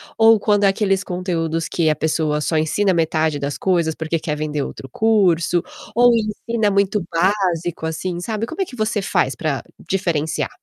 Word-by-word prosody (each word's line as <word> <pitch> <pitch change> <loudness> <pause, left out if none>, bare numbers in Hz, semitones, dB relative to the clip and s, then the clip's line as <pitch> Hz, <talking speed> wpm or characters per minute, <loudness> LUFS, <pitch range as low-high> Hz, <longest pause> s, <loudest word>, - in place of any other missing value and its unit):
Ou 225 -1 +6
quando 205 -1 +2
aqueles 195 0 +2
conteúdos 165 -3 -2
que 160 -3 +1
a 155 - +2
pessoa 155 -1 0
só 160 - -1
ensina 185 +6 +2
metade 160 -3 +1
das 140 0 -3
coisas 170 -4 +1
porque 160 +1 -2
quer 150 -1 -3
vender 150 -1 -2
outro 135 - -6
curso, 180 - +2 0.3
ou 245 +1 +6
ensina 220 0 -1
muito 200 -1 +1
básico 175 -2 0
assim, 170 +2 -3
sabe. 215 +4 -3
Como 325 +10 -5
é - - +1
que 255 - -11
você 215 -2 -1
faz 135 -8 +1
pra 140 -6 -2 0.3
diferenciar? 165 -5 -1
175 Hz, 170 wpm, -20 LUFS, 160-205 Hz, 0.3 s, Ou